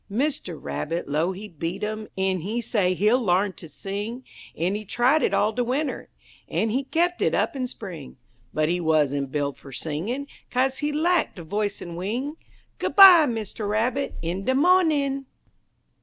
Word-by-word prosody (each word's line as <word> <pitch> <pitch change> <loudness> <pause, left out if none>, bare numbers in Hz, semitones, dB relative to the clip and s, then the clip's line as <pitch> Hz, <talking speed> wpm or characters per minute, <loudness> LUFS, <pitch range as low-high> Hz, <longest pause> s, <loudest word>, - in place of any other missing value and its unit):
Mister 230 - -1
Rabbit 165 +3 -4
'low 155 +5 0
he 195 +3 -7
beat 170 +2 -5
'im, 215 0 -3
en 190 -1 +1
he 215 +8 -2
say 205 -6 +1
he'll 215 +7 +3
l'arn 190 0 +2
ter 165 - -11
sing, 205 +9 -5 0.3
En 175 +4 0
he 210 +1 -3
tried 245 +9 +2
it - - +2
all 215 +1 +2
de 245 - 0
winter, 265 +4 -2 0.4
en 220 - 0
he 265 +4 -1
kep' 345 +5 0
it - - +2
up - - 0
in 255 -2 -2
spring; 180 - -9 0.3
But 155 0 +1
he 175 +2 0
wuzn't 145 -4 +1
buil' 145 -1 -1
fer 135 - -14
singin', 170 - -3 0.2
kaze 260 +1 0
he 295 0 -1
lack 335 +3 +1
de 175 - -8
voice 205 +5 -2
en 170 -1 -7
wing, 240 - -3 0.4
Good - - -2
by, 370 -6 +10
Mister 220 -3 -4
Rabbit, 235 +6 0
in 175 +4 -3
de 260 - +2
mawnin'! 290 -4 +3
215 Hz, 175 wpm, -25 LUFS, 175-265 Hz, 0.4 s, by